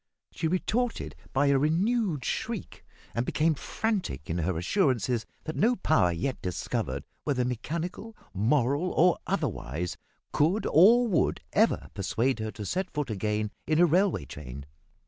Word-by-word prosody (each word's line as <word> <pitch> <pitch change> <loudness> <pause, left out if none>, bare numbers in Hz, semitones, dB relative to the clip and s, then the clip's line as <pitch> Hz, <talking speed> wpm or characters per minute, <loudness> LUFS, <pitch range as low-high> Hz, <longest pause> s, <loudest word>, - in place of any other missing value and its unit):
She 160 - -2
retorted 225 +8 -1 0.2
by 135 +2 +2
a 140 -1 +4
renewed 175 - +1
shriek, - - -4 0.3
and 115 - 0
became 155 +5 +2
frantic 180 - -3
in 85 - -1
her 85 +1 0
assurances 120 - +1 0.2
that 155 - -5
no 240 +4 +3
power 155 - +3
yet 105 +10 -3
discovered 70 -5 -3 0.2
whether 125 -4 0
mechanical, 170 - -4 0.2
moral, 135 - +2
or 180 +1 +4
otherwise 80 +8 -2 0.4
could 170 +9 +2
or 230 +9 +6
would, 180 -7 +1
ever - - +2
persuade 115 +6 0
her 110 0 -2
to 105 -1 -7
set 185 - -2
foot 145 -5 -3
again 105 0 -1 0.2
in 155 - +2
a 175 - +7
railway 175 - +2
train! 70 -1 -8
140 Hz, 145 wpm, -28 LUFS, -, 0.4 s, a